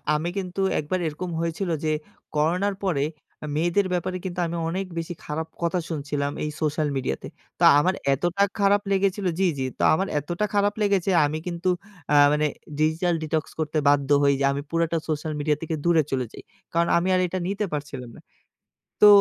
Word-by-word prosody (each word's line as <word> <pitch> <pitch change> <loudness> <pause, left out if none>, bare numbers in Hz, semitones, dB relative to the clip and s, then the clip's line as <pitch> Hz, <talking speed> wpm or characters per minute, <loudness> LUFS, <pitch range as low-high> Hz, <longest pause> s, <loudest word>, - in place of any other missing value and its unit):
আমি 160 +3 -1
কিন্তু 190 0 -3 0.2
একবার 170 +5 -1
এরকম 175 +4 -4
হয়েছিল 170 +3 -2
যে 155 - +1 0.4
করোনার 180 +7 +1
পরে 160 -8 +1 0.4
আ - - -3
মেয়েদের 175 +5 +2
ব্যাপারে 185 +1 -1
কিন্তু 180 -1 -4
আমি 170 +1 -3
অনেক 190 +3 -2
বেশি 165 +1 -4
খারাপ 160 +2 -3
কথা 170 +1 +1
শুনছিলাম 145 -2 -2
এই 150 - -1
সোশ্যাল 155 0 +1
মিডিয়াতে। 95 - -2 0.3
তা - - +5
আমার 185 +5 +2 0.2
এতটা 175 +8 +1 0.2
খারাপ 200 0 +4
লেগেছিল 195 0 +1
জি, 190 - +3
জি 130 - -1
তো - - -1
আমার 190 +5 +1
এতটা 175 +8 -2
খারাপ 205 0 +3
লেগেছে 200 -2 +2 0.2
আমি 150 +2 -2
কিন্তু 175 +1 -1 0.4
আ - - +5 0.2
মানে 150 0 +2 0.3
ডিজিটাল 160 +3 +2
ডিটক্স 155 0 -2
করতে 155 0 -1
বাধ্য 145 -1 +3
হই। 140 0 +5
যে 140 - +2
আমি 140 +1 -2
পুরাটা 165 0 +1
সোশ্যাল 155 0 -2
মিডিয়া 150 0 +1
থেকে 165 0 -2
দূরে 165 -2 +4
চলে 130 -2 0
যাই। - - -10 0.3
কারণ 170 0 +2
আমি 175 +2 +1
আর 185 - +3
এটা 185 +2 -3
নিতে 200 +2 -1
পারছিলাম 135 -5 -5
না। - - -14 0.8
তো 210 - +10
165 Hz, 185 wpm, -25 LUFS, 150-185 Hz, 0.8 s, তো